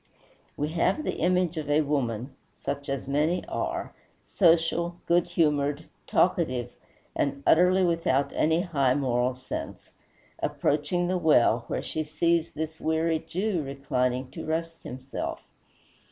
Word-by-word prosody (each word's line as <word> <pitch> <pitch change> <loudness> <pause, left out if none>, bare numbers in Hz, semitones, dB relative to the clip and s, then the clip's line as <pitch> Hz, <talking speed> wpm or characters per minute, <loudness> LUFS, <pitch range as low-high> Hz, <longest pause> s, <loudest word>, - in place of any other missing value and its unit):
We 150 +1 -1
have 180 - +1
the - - -2
image 180 -1 +1
of 150 -2 -4
a 150 +1 +4
woman 130 -4 -2 0.2
such 140 0 -5
as 135 -1 -3
many 150 +6 +1
are, - - -3 0.3
social, 170 -1 +2
good 175 0 +3
humored, 145 -3 +1 0.2
talkative, 125 -1 +1 0.4
and 140 0 -1
utterly 180 +3 +5
without 165 -6 +1
any 160 +2 +2
high 140 -8 +1
moral 125 -2 +1
sense 130 +1 -7 0.5
approaching 155 +5 0
the 185 0 0
well, 120 -7 +4
where - - -3
she 155 - -3
sees 160 +2 +1
this 160 +1 -5
weary 160 0 +1
Jew 190 0 -2
reclining 130 -2 -2
to - - -7
rest 165 +1 -3
himself. 130 +2 -6
155 Hz, 130 wpm, -27 LUFS, 135-170 Hz, 0.5 s, utterly